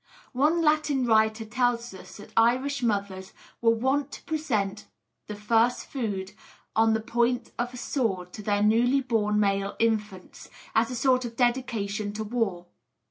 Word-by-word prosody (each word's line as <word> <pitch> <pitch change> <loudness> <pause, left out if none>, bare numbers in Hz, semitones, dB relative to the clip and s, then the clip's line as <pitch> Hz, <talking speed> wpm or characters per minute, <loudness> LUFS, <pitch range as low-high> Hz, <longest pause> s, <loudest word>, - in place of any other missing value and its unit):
One 305 +6 +2
Latin 300 -4 +2
writer 220 -1 +2
tells 240 0 -1
us 190 - -12
that 205 - -13
Irish 255 +5 +2
mothers 200 -4 -2 0.3
were 230 - +4
wont 265 +5 +1
to - - -9
present 215 -11 -2 0.4
the 210 - -5
first 225 +3 +1
food 205 -7 -4 0.4
on 225 0 +4
the - - 0
point 240 +2 0
of 245 +1 -1
a 250 - -9
sword 195 -10 -2
to 215 - -7
their 205 0 0
newly 240 +5 +3
born 210 -4 0
male 200 -1 0
infants, 210 -4 -2 0.2
as 225 +1 +2
a 250 - -4
sort 255 +1 +2
of 235 -1 -6
dedication 230 -5 -1
to 220 +1 -4
war. 210 -6 -2
225 Hz, 155 wpm, -26 LUFS, 210-250 Hz, 0.4 s, were